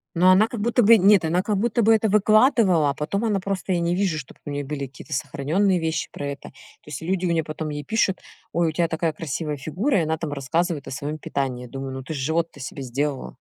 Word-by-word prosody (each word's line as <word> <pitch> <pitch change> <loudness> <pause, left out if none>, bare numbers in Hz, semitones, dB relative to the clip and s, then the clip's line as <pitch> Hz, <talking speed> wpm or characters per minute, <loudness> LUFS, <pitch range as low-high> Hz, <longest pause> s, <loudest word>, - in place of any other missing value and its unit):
Но 180 +2 +5
она 195 +4 +6
как 235 - -5
будто 235 +3 +2
бы 225 +2 +8
нет, 200 -2 +5
она 170 +3 +1
как 205 +1 -1
будто 235 +2 +1
бы 225 +2 +6
это 220 -1 +1
выкладывала, 215 - +4
а - - 0
потом 185 +9 -2
она 210 -3 +1
просто 190 0 -3
я 175 - +1
не 170 +1 0
вижу, 185 -5 0
чтоб 135 - -9
у - - -5
неё 145 -1 -3
были 140 -1 -4
какие-то 130 0 -10
сохранённые 160 +8 0
вещи 160 0 -2
про 145 - -6
это. 140 0 -7
То - - -22 0.3
есть 150 0 -6
люди 185 +2 -1
у 170 - +1
неё 165 -1 +1
потом 155 0 -5
ей 145 0 -5
пишут: 210 -4 +1 0.3
"Ой, 170 -1 +1
у - - -2
тя 170 0 +1
такая 160 -1 -1
красивая 150 0 -4
фигура",- 185 - 0
и - - +1
она 160 +1 -1
там 150 -2 -4
рассказывает 150 +2 -1
о - - -6
своём 145 +3 -4
питании. 130 -4 -3
Думаю: 135 +1 -6
"Ну 130 0 -6
ты 160 - -6
ж - - -4
живот-то 160 +3 -1
себе 135 +1 -7
сделала". 135 +2 -3
165 Hz, 250 wpm, -23 LUFS, 145-195 Hz, 0.3 s, бы